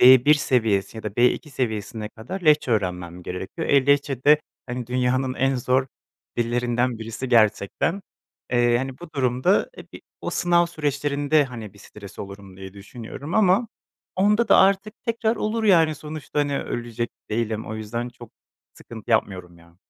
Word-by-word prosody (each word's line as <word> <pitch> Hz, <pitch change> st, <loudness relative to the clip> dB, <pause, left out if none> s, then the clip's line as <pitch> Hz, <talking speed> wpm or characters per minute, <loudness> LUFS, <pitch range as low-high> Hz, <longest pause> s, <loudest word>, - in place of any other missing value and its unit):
B1 130 Hz, +4 st, +8 dB
seviyesi 110 Hz, -8 st, 0 dB
ya 110 Hz, -, -7 dB
da 105 Hz, -, -2 dB
B2 125 Hz, +5 st, +2 dB
seviyesine 110 Hz, -4 st, -3 dB
kadar 125 Hz, -, -7 dB
Lehçe 150 Hz, -5 st, +4 dB
öğrenmem 90 Hz, -4 st, -2 dB
gerekiyor. 95 Hz, -, -5 dB
E, 140 Hz, -1 st, +4 dB
Lehçe 140 Hz, -2 st, +1 dB
de, 150 Hz, +1 st, +6 dB, 0.3 s
hani, 125 Hz, -1 st, -5 dB
dünyanın 130 Hz, +1 st, 0 dB
en 135 Hz, 0 st, +1 dB
zor 130 Hz, +2 st, +1 dB, 0.5 s
dillerinden 120 Hz, 0 st, 0 dB
birisi 115 Hz, +3 st, -5 dB
gerçekten. 115 Hz, -, +2 dB, 0.5 s
Eee, 120 Hz, -1 st, +3 dB
hani, 135 Hz, +1 st, -5 dB
bu 175 Hz, -2 st, -11 dB
durumda, 130 Hz, -, +1 dB
e, -, -, -13 dB
bi -, -, -10 dB, 0.2 s
o -, -, -4 dB
sınav 175 Hz, -1 st, +2 dB
süreçlerinde, 145 Hz, -1 st, 0 dB
hani, 115 Hz, -6 st, -8 dB
bir 100 Hz, -, -19 dB
stres 100 Hz, -1 st, -13 dB
olurum 100 Hz, -1 st, -9 dB
diye 95 Hz, 0 st, -9 dB
düşünüyorum 120 Hz, -, -8 dB
ama 215 Hz, +2 st, +3 dB, 0.5 s
onda 210 Hz, +5 st, +3 dB
da -, -, +7 dB
artık 195 Hz, +2 st, +3 dB
tekrar 230 Hz, -1 st, 0 dB
olur, 220 Hz, +2 st, -1 dB
yani, 165 Hz, -6 st, +5 dB
sonuçta, 150 Hz, 0 st, -6 dB
hani, 145 Hz, -1 st, 0 dB
ölecek 120 Hz, 0 st, -4 dB, 0.2 s
değilim. 110 Hz, 0 st, -2 dB
O 110 Hz, -, -5 dB
yüzden 115 Hz, +3 st, -4 dB
çok 120 Hz, -2 st, -13 dB, 0.4 s
sıkıntı 115 Hz, 0 st, -11 dB
yapmıyorum 90 Hz, -5 st, -1 dB
ya. 85 Hz, 0 st, -21 dB
125 Hz, 155 wpm, -23 LUFS, 110-150 Hz, 0.5 s, B1